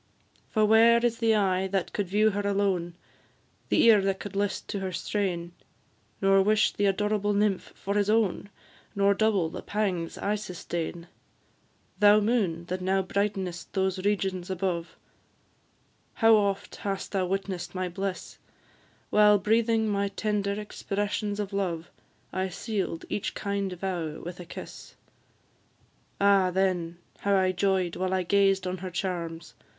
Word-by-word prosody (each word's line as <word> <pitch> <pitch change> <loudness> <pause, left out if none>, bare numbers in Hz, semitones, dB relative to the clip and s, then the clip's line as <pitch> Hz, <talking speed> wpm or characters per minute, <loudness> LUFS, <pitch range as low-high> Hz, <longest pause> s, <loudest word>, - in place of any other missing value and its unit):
For 215 -1 +2
where 225 +2 +6
is 230 -1 0
the 225 -1 +3
eye 190 -2 +1
that 190 -1 -2
could 205 -3 -1
view 210 +4 +3
her 205 +1 -2
alone, 195 -4 0 0.7
The - - +4
ear 225 -3 +7
that 195 0 -1
could 205 -1 -7
list 205 0 -1
to 200 - -2
her 190 -1 -3
strain, 180 -2 -2 0.7
Nor 195 0 +5
wish 215 +2 +3
the 205 - 0
adorable 205 +1 +1
nymph 205 -2 0
for 200 - -3
his 205 0 +1
own, 210 -2 +1 0.5
Nor 200 0 +4
double 200 -5 +2
the - - -6
pangs 190 -6 -2
I 205 - -1
sustain? 175 -4 -5 0.9
Thou 210 0 +7
moon, 205 -7 0
that 185 +1 -4
now 190 +1 +1
brighten'st 190 -2 -2
those 190 -1 0
regions 195 -3 -1
above, 180 -2 -2 1.2
How 225 0 +6
oft 200 -1 -1
hast 195 -1 -4
thou 190 -2 0
witness'd 185 -2 -3
my 185 0 -1
bliss, 190 +2 -5 0.7
While 210 0 +6
breathing 225 +2 +2
my 200 -1 0
tender 200 -1 -1
expressions 205 0 -3
of 200 -1 -3
love, 175 -4 -2 0.4
I 190 0 -1
seal'd 195 -3 -3
each 205 - -3
kind 200 -1 -2
vow 175 -4 -4
with 175 +1 -8
a 180 - -8
kiss! - - -10 1.2
Ah, 200 -2 +4
then, 180 -2 0 0.2
how 200 0 +1
I 185 -1 +3
joy'd 185 -1 0
while 185 0 0
I 185 - 0
gazed 195 0 +2
on 185 0 -3
her 185 +1 -5
charms! 170 -2 -4
195 Hz, 145 wpm, -27 LUFS, 185-205 Hz, 1.2 s, ear